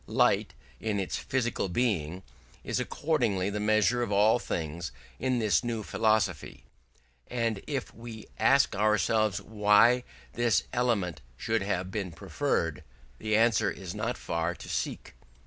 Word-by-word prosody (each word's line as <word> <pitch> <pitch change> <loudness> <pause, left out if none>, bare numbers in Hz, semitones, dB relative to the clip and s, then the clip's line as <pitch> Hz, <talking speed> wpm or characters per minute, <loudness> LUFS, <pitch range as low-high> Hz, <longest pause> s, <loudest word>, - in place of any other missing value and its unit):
Light, - - +2 0.2
in 105 -2 -1
its 95 - -2
physical 120 -6 -1
being, 90 -5 -1 0.4
is - - -1
accordingly 115 - 0
the 105 - -3
measure 110 +3 +3
of 120 -4 -2
all 105 +4 +4
things 80 - -4 0.3
in 130 0 +1
this 105 -8 +2
new 115 -2 -2
philosophy: 110 +1 0 0.6
and 115 -4 -1
if 140 -3 -3
we 115 -2 -9
ask 135 -5 +4
ourselves 105 0 +2
why 110 +3 +4 0.3
this 120 -4 +2
element 115 -8 0 0.2
should 110 - 0
have 95 -2 -2
been 95 -3 -3
preferred, 80 - -2 0.4
the 110 0 0
answer 110 -2 +3
is 95 -2 -6
not - - -2
far 85 +1 -2
to - - -11
seek. - - -3
110 Hz, 135 wpm, -29 LUFS, 95-120 Hz, 0.6 s, all